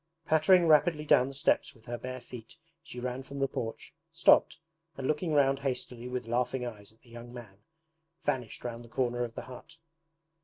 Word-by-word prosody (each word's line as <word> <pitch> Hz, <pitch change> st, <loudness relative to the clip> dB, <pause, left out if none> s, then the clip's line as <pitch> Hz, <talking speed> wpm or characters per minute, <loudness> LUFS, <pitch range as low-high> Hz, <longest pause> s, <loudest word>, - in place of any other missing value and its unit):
Pattering 165 Hz, +3 st, +5 dB
rapidly 155 Hz, 0 st, +4 dB
down 130 Hz, -3 st, +5 dB
the 135 Hz, -, -7 dB
steps 135 Hz, -, +1 dB
with 115 Hz, -, -21 dB
her 120 Hz, -1 st, -4 dB
bare 130 Hz, 0 st, -5 dB
feet 120 Hz, -2 st, -11 dB, 0.3 s
she 160 Hz, -6 st, -9 dB
ran 125 Hz, +1 st, -3 dB
from 140 Hz, +1 st, -9 dB
the 135 Hz, 0 st, +1 dB
porch, 115 Hz, -3 st, -5 dB, 0.2 s
stopped, -, -, +4 dB, 0.4 s
and 135 Hz, -, -4 dB
looking 155 Hz, +2 st, 0 dB
round 135 Hz, -1 st, +4 dB
hastily 125 Hz, -3 st, -3 dB
with 125 Hz, -1 st, -4 dB
laughing 125 Hz, +2 st, -1 dB
eyes 105 Hz, -4 st, -8 dB
at 110 Hz, -, -27 dB
the 120 Hz, -, -21 dB
young 120 Hz, +1 st, -10 dB
man, 115 Hz, -6 st, -11 dB, 0.6 s
vanished 130 Hz, -6 st, -2 dB
round 120 Hz, -1 st, -5 dB
the 115 Hz, -, -14 dB
corner 120 Hz, 0 st, 0 dB
of 115 Hz, -1 st, -6 dB
the -, -, -5 dB
hut. 130 Hz, +6 st, -12 dB
125 Hz, 190 wpm, -30 LUFS, 120-140 Hz, 0.6 s, Pattering